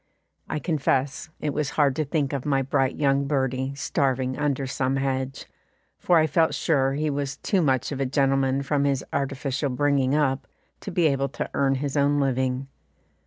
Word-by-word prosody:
I -, -, -1 dB
confess 145 Hz, -2 st, -1 dB
it 150 Hz, -2 st, -2 dB
was 150 Hz, -1 st, -1 dB
hard 140 Hz, -3 st, +3 dB
to 155 Hz, -, +1 dB
think 145 Hz, -1 st, -1 dB
of 135 Hz, -3 st, -2 dB
my 135 Hz, -2 st, +1 dB
bright 135 Hz, 0 st, 0 dB
young 140 Hz, -1 st, +1 dB
birdie 130 Hz, -1 st, -1 dB
starving 130 Hz, -2 st, 0 dB
under 140 Hz, -2 st, -1 dB
some 130 Hz, 0 st, -1 dB
hedge, 135 Hz, 0 st, -2 dB, 0.5 s
for 175 Hz, -, +3 dB
I 155 Hz, -, +5 dB
felt 160 Hz, +2 st, +2 dB
sure 135 Hz, -4 st, +1 dB
he 150 Hz, +1 st, -1 dB
was 140 Hz, -1 st, -3 dB
too 195 Hz, +4 st, 0 dB
much 130 Hz, -4 st, +1 dB
of 140 Hz, -, -4 dB
a 135 Hz, -, 0 dB
gentleman 135 Hz, 0 st, +1 dB
from 140 Hz, 0 st, 0 dB
his 140 Hz, -2 st, 0 dB
artificial 140 Hz, 0 st, -1 dB
bringing 135 Hz, +1 st, +1 dB
up 140 Hz, -3 st, 0 dB, 0.3 s
to -, -, -7 dB
be 175 Hz, -2 st, +1 dB
able 140 Hz, -2 st, +1 dB
to -, -, -5 dB
earn 135 Hz, -1 st, +2 dB
his 140 Hz, +1 st, -3 dB
own 145 Hz, 0 st, +3 dB
living. 130 Hz, -1 st, 0 dB
140 Hz, 180 wpm, -25 LUFS, 135-145 Hz, 0.5 s, I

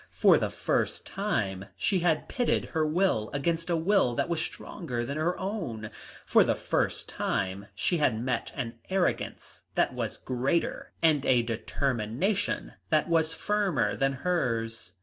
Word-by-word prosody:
For -, -, +6 dB
the -, -, 0 dB
first -, -, -1 dB
time 100 Hz, -, -1 dB
she 195 Hz, -3 st, +2 dB
had 165 Hz, -2 st, +1 dB
pitted 245 Hz, -2 st, +1 dB
her 160 Hz, -2 st, +2 dB
will 155 Hz, -, +1 dB
against 165 Hz, +4 st, -1 dB
a 170 Hz, -, +2 dB
will 165 Hz, -7 st, +3 dB
that -, -, 0 dB
was 170 Hz, -2 st, 0 dB
stronger 125 Hz, -11 st, -4 dB
than 140 Hz, -, -4 dB
her 160 Hz, +3 st, 0 dB
own, 135 Hz, -, -4 dB, 0.3 s
for -, -, +6 dB
the -, -, +1 dB
first -, -, -1 dB
time 95 Hz, +2 st, -2 dB
she 175 Hz, -, +1 dB
had 120 Hz, -7 st, +2 dB
met 125 Hz, +2 st, -1 dB
an 115 Hz, -4 st, -4 dB
arrogance 190 Hz, -1 st, -1 dB
that -, -, +2 dB
was -, -, -3 dB
greater 130 Hz, +6 st, -1 dB
and 155 Hz, -4 st, +4 dB
a 125 Hz, -2 st, +5 dB
determination 120 Hz, -, -1 dB, 0.2 s
that 155 Hz, +2 st, +2 dB
was 165 Hz, -1 st, +2 dB
firmer 190 Hz, -, +1 dB
than 135 Hz, 0 st, +1 dB
hers. 115 Hz, -, -1 dB
145 Hz, 150 wpm, -29 LUFS, 115-175 Hz, 0.3 s, For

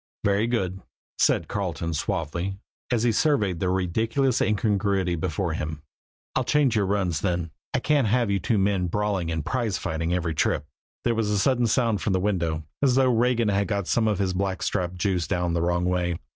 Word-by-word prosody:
"Very 100 Hz, +3 st, +2 dB
good," 95 Hz, -6 st, -1 dB, 0.4 s
said -, -, +3 dB
Carleton 85 Hz, -4 st, -3 dB
suavely, 85 Hz, +2 st, -2 dB, 0.3 s
as 120 Hz, -2 st, +2 dB
he 120 Hz, -, +3 dB
surveyed 105 Hz, -, +1 dB
the 90 Hz, -, 0 dB
ridiculous 110 Hz, +8 st, +1 dB
incongruity 100 Hz, -3 st, +1 dB
before 85 Hz, +1 st, -2 dB
him. 80 Hz, -1 st, -4 dB, 0.5 s
"I'll -, -, +2 dB
change 140 Hz, -6 st, +2 dB
your 100 Hz, -3 st, +2 dB
runs, 95 Hz, -5 st, 0 dB
then. 85 Hz, -4 st, -1 dB, 0.2 s
I -, -, +1 dB
can't 145 Hz, -5 st, +2 dB
have 115 Hz, -1 st, +2 dB
you 100 Hz, -, +1 dB
two 115 Hz, 0 st, 0 dB
men 95 Hz, -2 st, +1 dB
brawling 100 Hz, -2 st, -1 dB
and 80 Hz, -2 st, -3 dB
prize 120 Hz, -6 st, -1 dB
fighting 80 Hz, +1 st, -2 dB
every 85 Hz, -2 st, 0 dB
trip." 75 Hz, -, 0 dB, 0.4 s
There 120 Hz, -, +2 dB
was 110 Hz, -2 st, 0 dB
a 105 Hz, -, +1 dB
sudden 120 Hz, +3 st, +2 dB
sound 115 Hz, -3 st, +1 dB
from 100 Hz, -, 0 dB
the 95 Hz, -, +2 dB
window, 85 Hz, -5 st, -1 dB, 0.2 s
as 135 Hz, -3 st, +3 dB
though 130 Hz, -2 st, +4 dB
Regan 120 Hz, -1 st, +2 dB
had 100 Hz, 0 st, +1 dB
got 100 Hz, -3 st, -1 dB
some 110 Hz, +4 st, +1 dB
of 105 Hz, -2 st, +1 dB
his 95 Hz, -2 st, 0 dB
blackstrap 95 Hz, -1 st, -1 dB
juice 90 Hz, -2 st, 0 dB
down 90 Hz, -1 st, 0 dB
the 85 Hz, -, 0 dB
wrong 90 Hz, +1 st, +1 dB
way. 90 Hz, -1 st, 0 dB
100 Hz, 190 wpm, -25 LUFS, 90-110 Hz, 0.5 s, though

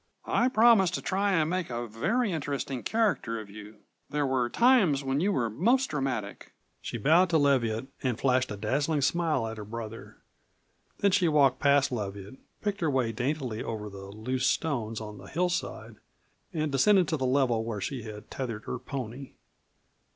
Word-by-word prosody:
"I 245 Hz, -, +2 dB
promise 225 Hz, -6 st, +5 dB
to -, -, -6 dB
try 195 Hz, +1 st, +1 dB
and 160 Hz, -4 st, +2 dB
make 180 Hz, +1 st, -2 dB
a 120 Hz, 0 st, -3 dB
very 200 Hz, -, 0 dB
interesting 140 Hz, -5 st, -3 dB
character 205 Hz, -, 0 dB
of 105 Hz, -2 st, -10 dB
you 105 Hz, 0 st, -12 dB, 0.3 s
there 150 Hz, 0 st, 0 dB
were 130 Hz, -2 st, 0 dB
times 205 Hz, -, +4 dB
when 135 Hz, +1 st, 0 dB
you 195 Hz, +6 st, +2 dB
were 125 Hz, -11 st, +1 dB
most 235 Hz, -, +1 dB
dramatic." 135 Hz, -8 st, -3 dB, 0.3 s
She -, -, -5 dB
bowed 165 Hz, -, +4 dB
to 165 Hz, -, +3 dB
Leviatt 130 Hz, -6 st, +2 dB, 0.2 s
and 125 Hz, -4 st, -1 dB
flashed 130 Hz, -1 st, +2 dB
a 105 Hz, -, -5 dB
dazzling 140 Hz, +8 st, 0 dB
smile 155 Hz, -4 st, +1 dB
at 110 Hz, 0 st, -5 dB
her 105 Hz, -, -6 dB
brother. 115 Hz, +1 st, -8 dB, 0.8 s
Then 200 Hz, -, +4 dB
she 185 Hz, -2 st, +3 dB
walked 140 Hz, -4 st, +3 dB
past 140 Hz, -1 st, +3 dB
Leviatt, 100 Hz, 0 st, -5 dB, 0.3 s
picked 205 Hz, -1 st, -2 dB
her 160 Hz, -, +2 dB
way 130 Hz, -4 st, +1 dB
daintily 125 Hz, -1 st, -2 dB
over 105 Hz, -2 st, -5 dB
the 95 Hz, 0 st, -9 dB
loose 125 Hz, +6 st, -2 dB
stones 120 Hz, -9 st, -1 dB
on 105 Hz, -1 st, -8 dB
the 95 Hz, -, -12 dB
hillside, 180 Hz, -, -2 dB, 0.5 s
and 155 Hz, -4 st, -2 dB
descended 180 Hz, +7 st, +4 dB
to 160 Hz, -, 0 dB
the 130 Hz, -2 st, -1 dB
level 125 Hz, -4 st, +2 dB
where 115 Hz, -2 st, -4 dB
she 130 Hz, +5 st, -4 dB
had 105 Hz, -1 st, -10 dB
tethered 115 Hz, -5 st, -4 dB
her 125 Hz, -, -4 dB
pony. 130 Hz, 0 st, -6 dB
135 Hz, 175 wpm, -28 LUFS, 115-165 Hz, 0.8 s, promise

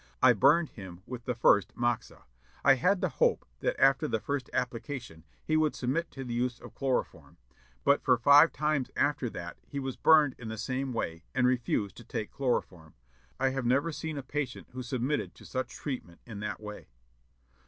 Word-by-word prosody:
I -, -, +7 dB
burned 155 Hz, +4 st, +4 dB
him 95 Hz, -3 st, -10 dB
with 125 Hz, -2 st, -7 dB
the 125 Hz, -, -1 dB
first 100 Hz, -3 st, +3 dB
moxa. 120 Hz, -1 st, -2 dB, 0.4 s
I -, -, +8 dB
had 180 Hz, +9 st, +2 dB
the -, -, +1 dB
hope 485 Hz, -1 st, +1 dB
that -, -, -1 dB
after -, -, +4 dB
the -, -, 0 dB
first 140 Hz, -4 st, -3 dB
application 120 Hz, -, -4 dB, 0.2 s
he 155 Hz, -, 0 dB
would 155 Hz, -1 st, +2 dB
submit 150 Hz, +7 st, -1 dB
to 135 Hz, -, -7 dB
the 120 Hz, -2 st, -5 dB
use 120 Hz, 0 st, -1 dB
of -, -, -12 dB
chloroform; 135 Hz, -2 st, -2 dB, 0.5 s
but 140 Hz, -, +4 dB
for 125 Hz, -2 st, +3 dB
five 145 Hz, +7 st, +7 dB
times 150 Hz, -3 st, 0 dB
after 140 Hz, -3 st, +1 dB
that 85 Hz, -4 st, -7 dB
he 140 Hz, -, -7 dB
was 135 Hz, -2 st, -4 dB
burned 155 Hz, -4 st, +5 dB
in 115 Hz, -, -7 dB
the 110 Hz, 0 st, -5 dB
same 130 Hz, +4 st, -2 dB
way, 85 Hz, -7 st, -3 dB
and 125 Hz, -1 st, +3 dB
refused 120 Hz, -6 st, 0 dB
to 120 Hz, -, -10 dB
take 105 Hz, -1 st, -5 dB
chloroform. 90 Hz, -, -2 dB, 0.4 s
I 135 Hz, 0 st, +3 dB
have 130 Hz, -2 st, -2 dB
never 140 Hz, +7 st, +2 dB
seen 160 Hz, 0 st, -5 dB
a 140 Hz, -, -4 dB
patient 135 Hz, -1 st, -4 dB
who 130 Hz, -, -6 dB
submitted 130 Hz, +3 st, -2 dB
to -, -, -15 dB
such 130 Hz, -1 st, -3 dB
treatment 125 Hz, -, -6 dB
in 110 Hz, -4 st, -8 dB
that 105 Hz, -3 st, -4 dB
way." 105 Hz, -1 st, -9 dB
130 Hz, 190 wpm, -30 LUFS, 115-145 Hz, 0.5 s, I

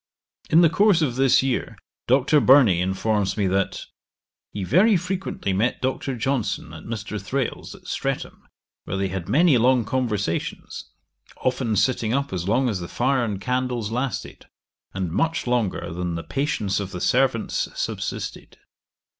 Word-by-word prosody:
In 165 Hz, -, +6 dB
the 170 Hz, -, +6 dB
course 200 Hz, -2 st, +4 dB
of 125 Hz, -5 st, -1 dB
this 135 Hz, 0 st, +4 dB
year 135 Hz, -2 st, -2 dB, 0.3 s
Dr. 135 Hz, +4 st, +4 dB
Burney 125 Hz, -8 st, +5 dB
informs 95 Hz, +1 st, 0 dB
me 100 Hz, -, +1 dB
that 95 Hz, +1 st, -1 dB, 0.6 s
'he 100 Hz, -, -5 dB
very 195 Hz, -, +4 dB
frequently 185 Hz, -, -3 dB
met 110 Hz, +6 st, 0 dB
Dr. 130 Hz, 0 st, -2 dB
Johnson 110 Hz, -, -2 dB
at 80 Hz, -, -10 dB
Mr. 105 Hz, -2 st, -5 dB
Thrale's, 130 Hz, +5 st, -3 dB
at -, -, -18 dB
Streatham, -, -, -3 dB, 0.4 s
where 95 Hz, -, -3 dB
they 95 Hz, 0 st, -1 dB
had 90 Hz, -2 st, -5 dB
many 155 Hz, -3 st, +4 dB
long 125 Hz, 0 st, +3 dB
conversations, 105 Hz, -8 st, -2 dB, 0.6 s
often 125 Hz, -3 st, 0 dB
sitting 115 Hz, +1 st, +1 dB
up 140 Hz, -4 st, -1 dB
as 90 Hz, -1 st, -3 dB
long 125 Hz, +5 st, +2 dB
as 105 Hz, -6 st, -1 dB
the 85 Hz, -, -6 dB
fire 130 Hz, +4 st, +1 dB
and 105 Hz, -4 st, -3 dB
candles 125 Hz, -2 st, -2 dB
lasted, 125 Hz, +2 st, -4 dB, 0.4 s
and 95 Hz, -3 st, -3 dB
much 165 Hz, -, 0 dB
longer 120 Hz, -8 st, -1 dB
than 90 Hz, 0 st, -3 dB
the 85 Hz, -, -4 dB
patience 135 Hz, -9 st, -1 dB
of 100 Hz, -2 st, -4 dB
the 90 Hz, -2 st, -6 dB
servants 125 Hz, +2 st, +1 dB
subsisted.' -, -, -4 dB
120 Hz, 155 wpm, -23 LUFS, 100-135 Hz, 0.6 s, In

